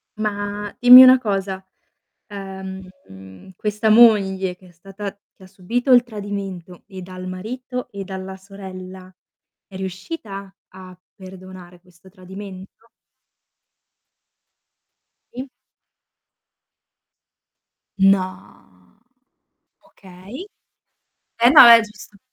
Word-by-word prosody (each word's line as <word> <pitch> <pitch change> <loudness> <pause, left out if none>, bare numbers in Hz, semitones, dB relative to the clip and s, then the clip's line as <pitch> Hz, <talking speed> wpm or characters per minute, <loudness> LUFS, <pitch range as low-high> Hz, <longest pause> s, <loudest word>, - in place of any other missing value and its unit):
Ma, 205 -1 -5
dimmi 250 +1 +10
una 255 0 +7
cosa, 195 -4 -4 0.6
ehm, 190 - -11
questa 210 +1 -2
moglie 195 -5 +4
che 185 -1 -20
è - - -20
stata 195 +3 -9 0.2
che 190 - -20
ha - - -14
subito 230 +8 -3
il 245 -1 +6
tradimento 200 -5 -8
e 190 -2 -10
dal 185 0 -9
marito 250 +7 -7
e 200 -1 -8
dalla 190 0 -8
sorella, 190 -1 -12 0.5
è 190 - -15
riuscita 195 - -8 0.2
a 185 -1 -14 0.2
perdonare 185 -2 -13
questo 180 +1 -22
tradimento? 190 +3 -12 2.5
Sì. 260 +3 -8 2.5
No. 185 - -2 0.9
Okay. 190 - -13 1.0
Eh 240 - +6
no, 290 -2 +9
è 230 -1 +9
giusto. 210 -1 -13
195 Hz, 90 wpm, -20 LUFS, 185-210 Hz, 2.5 s, dimmi